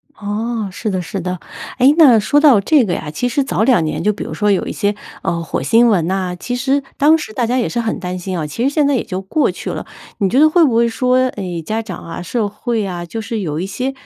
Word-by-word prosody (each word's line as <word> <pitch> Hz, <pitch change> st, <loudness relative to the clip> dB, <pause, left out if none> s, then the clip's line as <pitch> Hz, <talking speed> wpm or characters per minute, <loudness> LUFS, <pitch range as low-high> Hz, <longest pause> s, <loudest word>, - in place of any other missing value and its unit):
哦， 215 Hz, +1 st, -3 dB
是 215 Hz, -, -4 dB
的 185 Hz, -2 st, -1 dB
是 185 Hz, +3 st, -5 dB
的。 180 Hz, 0 st, -4 dB, 0.4 s
诶， 260 Hz, +3 st, +5 dB
那 260 Hz, -9 st, +7 dB
说 285 Hz, +8 st, +2 dB
到 285 Hz, -8 st, +6 dB
这 275 Hz, +6 st, +3 dB
个 180 Hz, -, -1 dB
呀， 150 Hz, -3 st, -4 dB
其 245 Hz, +10 st, -2 dB
实 275 Hz, +4 st, +1 dB
早 265 Hz, -, 0 dB
2 230 Hz, -9 st, +4 dB
年 155 Hz, -, -3 dB
就 210 Hz, -, +3 dB
比 205 Hz, -, -6 dB
如 -, -, -6 dB
说 210 Hz, 0 st, 0 dB
有 195 Hz, -, +1 dB
一 -, -, -4 dB
些， 205 Hz, -1 st, -1 dB, 0.3 s
呃， 170 Hz, 0 st, -2 dB
火 160 Hz, -, -3 dB
星 230 Hz, -, +4 dB
文 175 Hz, -7 st, +2 dB
呐， 185 Hz, -1 st, -2 dB
其 245 Hz, -, -3 dB
实 270 Hz, +3 st, +1 dB, 0.2 s
当 305 Hz, +3 st, +5 dB
时 220 Hz, -8 st, -7 dB
大 240 Hz, 0 st, 0 dB
家 245 Hz, +3 st, 0 dB
也 245 Hz, -, 0 dB
是 240 Hz, -, -2 dB
很 225 Hz, -2 st, -2 dB
担 180 Hz, 0 st, -4 dB
心 185 Hz, 0 st, -4 dB
啊， 155 Hz, -2 st, -3 dB
其 230 Hz, +10 st, -4 dB
实 270 Hz, -, +3 dB
现 290 Hz, 0 st, +1 dB
在 285 Hz, -, +2 dB
也 -, -, 0 dB
就 185 Hz, +1 st, -5 dB
过 295 Hz, +11 st, 0 dB
去 -, -, -7 dB
了。 -, -, -5 dB, 0.3 s
你 195 Hz, -3 st, +2 dB
觉 255 Hz, -, +2 dB
得 310 Hz, +1 st, +6 dB
会 335 Hz, 0 st, +4 dB
不 250 Hz, -6 st, +1 dB
会 235 Hz, 0 st, +4 dB
说， 250 Hz, +2 st, +1 dB
诶， 180 Hz, -7 st, -5 dB
家 215 Hz, +7 st, -2 dB
长 190 Hz, -6 st, -8 dB
啊， 170 Hz, +1 st, -7 dB
社 210 Hz, +4 st, -1 dB
会 215 Hz, +1 st, -2 dB
啊， 175 Hz, -2 st, -5 dB
就 225 Hz, +6 st, -5 dB
是 220 Hz, 0 st, -4 dB
有 155 Hz, -4 st, -3 dB
一 185 Hz, -, -3 dB
些 250 Hz, +7 st, -3 dB
220 Hz, 290 characters per minute, -17 LUFS, 185-250 Hz, 0.4 s, 那